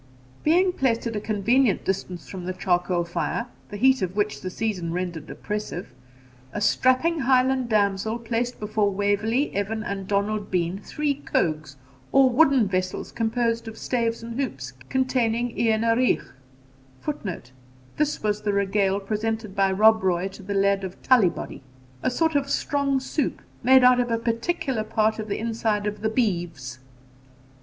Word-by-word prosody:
Being 360 Hz, +4 st, +3 dB
placed 245 Hz, -7 st, 0 dB
at 230 Hz, -1 st, -3 dB
a 210 Hz, -, -2 dB
convenient 225 Hz, +3 st, +2 dB
distance 180 Hz, -5 st, -3 dB
from 180 Hz, +3 st, -7 dB
the 185 Hz, -, -2 dB
charcoal 180 Hz, -1 st, 0 dB
fire, 170 Hz, +6 st, -2 dB, 0.2 s
the 205 Hz, -, -6 dB
heat 260 Hz, +4 st, +4 dB
of 185 Hz, 0 st, -2 dB
which 210 Hz, 0 st, -1 dB
the 185 Hz, -, -4 dB
season 185 Hz, -4 st, -2 dB
rendered 170 Hz, -3 st, -4 dB
oppressive, 210 Hz, -8 st, -5 dB, 0.6 s
a -, -, -2 dB
strapping 255 Hz, +10 st, +2 dB
Highland 260 Hz, -1 st, +2 dB
damsel 210 Hz, +1 st, +1 dB
placed 235 Hz, +1 st, -2 dB
before 210 Hz, -1 st, 0 dB
Waverley, 205 Hz, +7 st, 0 dB
Evan, 215 Hz, +2 st, -2 dB
and 195 Hz, -3 st, -4 dB
Donald 205 Hz, +1 st, -1 dB
Bean 180 Hz, +1 st, -1 dB
three 295 Hz, +7 st, -1 dB
cogues, 155 Hz, -, -2 dB, 0.4 s
or 270 Hz, -1 st, +5 dB
wooden 265 Hz, -4 st, +4 dB
vessels 185 Hz, -1 st, -2 dB
composed 230 Hz, 0 st, -1 dB
of 225 Hz, 0 st, -8 dB
staves 230 Hz, -2 st, -1 dB
and 230 Hz, +2 st, -6 dB
hoops, 135 Hz, -, -4 dB, 0.2 s
containing 245 Hz, -2 st, 0 dB
eanaruich, 230 Hz, +2 st, +2 dB, 0.8 s
[Footnote: 185 Hz, -, -5 dB, 0.5 s
This 300 Hz, -4 st, 0 dB
was 210 Hz, 0 st, 0 dB
the 205 Hz, -1 st, -1 dB
regale 200 Hz, 0 st, +1 dB
presented 215 Hz, 0 st, -3 dB
by 195 Hz, -1 st, +3 dB
Rob 220 Hz, +3 st, +5 dB
Roy 185 Hz, 0 st, 0 dB
to 195 Hz, -, -12 dB
the 200 Hz, +1 st, -4 dB
Laird 195 Hz, 0 st, +2 dB
of 190 Hz, -1 st, -6 dB
Tullibody.] 220 Hz, -10 st, +2 dB, 0.4 s
a -, -, +1 dB
sort 320 Hz, +5 st, +1 dB
of 280 Hz, -1 st, 0 dB
strong 280 Hz, -1 st, 0 dB
soup, 265 Hz, +2 st, -2 dB, 0.2 s
made 260 Hz, +1 st, +6 dB
out 250 Hz, 0 st, +6 dB
of 245 Hz, -1 st, 0 dB
a 230 Hz, -, +1 dB
particular 230 Hz, +1 st, -1 dB
part 215 Hz, 0 st, +1 dB
of 215 Hz, -, -4 dB
the 205 Hz, -, -2 dB
inside 220 Hz, -2 st, -1 dB
of 210 Hz, 0 st, -3 dB
the 220 Hz, -, +1 dB
beeves. 170 Hz, -, -2 dB
215 Hz, 155 wpm, -24 LUFS, 195-245 Hz, 0.8 s, made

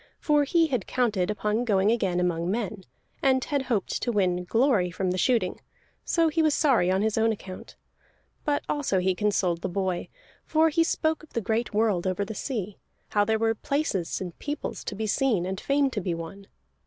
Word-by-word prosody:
For 295 Hz, -1 st, +3 dB
he 330 Hz, +3 st, +3 dB
had 255 Hz, -, -2 dB
counted 215 Hz, -8 st, 0 dB
upon 210 Hz, +2 st, 0 dB
going 205 Hz, -3 st, +3 dB
again 190 Hz, -6 st, +1 dB
among 175 Hz, -1 st, 0 dB
men, 205 Hz, -2 st, -3 dB, 0.4 s
and 260 Hz, -1 st, +3 dB
had 285 Hz, -2 st, -1 dB
hoped 240 Hz, -7 st, -1 dB
to 240 Hz, -, 0 dB
win 180 Hz, -4 st, +1 dB
glory 225 Hz, -4 st, +2 dB
from 185 Hz, +1 st, -2 dB
the 185 Hz, -, -1 dB
shooting, 245 Hz, +2 st, +1 dB, 0.4 s
so 330 Hz, -1 st, +2 dB
he 320 Hz, +1 st, +1 dB
was 310 Hz, -2 st, +3 dB
sorry 255 Hz, -, +3 dB
on 190 Hz, +2 st, +2 dB
his 220 Hz, 0 st, +1 dB
own 225 Hz, 0 st, +3 dB
account. 190 Hz, -3 st, -8 dB, 0.7 s
But 290 Hz, -2 st, 0 dB
also 285 Hz, -10 st, 0 dB
he 185 Hz, +1 st, +2 dB
consoled 185 Hz, -4 st, 0 dB
the -, -, -2 dB
boy. 185 Hz, -1 st, -2 dB, 0.4 s
For 320 Hz, 0 st, +3 dB
he 330 Hz, +2 st, +3 dB
spoke 320 Hz, -1 st, 0 dB
of 315 Hz, -, -17 dB
the -, -, 0 dB
great 225 Hz, +3 st, -1 dB
world 210 Hz, -5 st, +2 dB
over 185 Hz, +2 st, -1 dB
the 220 Hz, -, -6 dB
sea, 210 Hz, -5 st, -4 dB, 0.3 s
how 205 Hz, -, +3 dB
there 220 Hz, +1 st, +2 dB
were 225 Hz, 0 st, +2 dB
places 225 Hz, -, -2 dB
and 180 Hz, -3 st, -6 dB
peoples 295 Hz, 0 st, -4 dB
to 200 Hz, -, -4 dB
be 220 Hz, +2 st, -3 dB
seen, 215 Hz, -4 st, +1 dB
and 190 Hz, +1 st, -4 dB
fame 280 Hz, -1 st, +2 dB
to 210 Hz, -, -2 dB
be 175 Hz, -2 st, -2 dB
won. 180 Hz, +4 st, -8 dB
215 Hz, 200 wpm, -26 LUFS, 185-265 Hz, 0.7 s, For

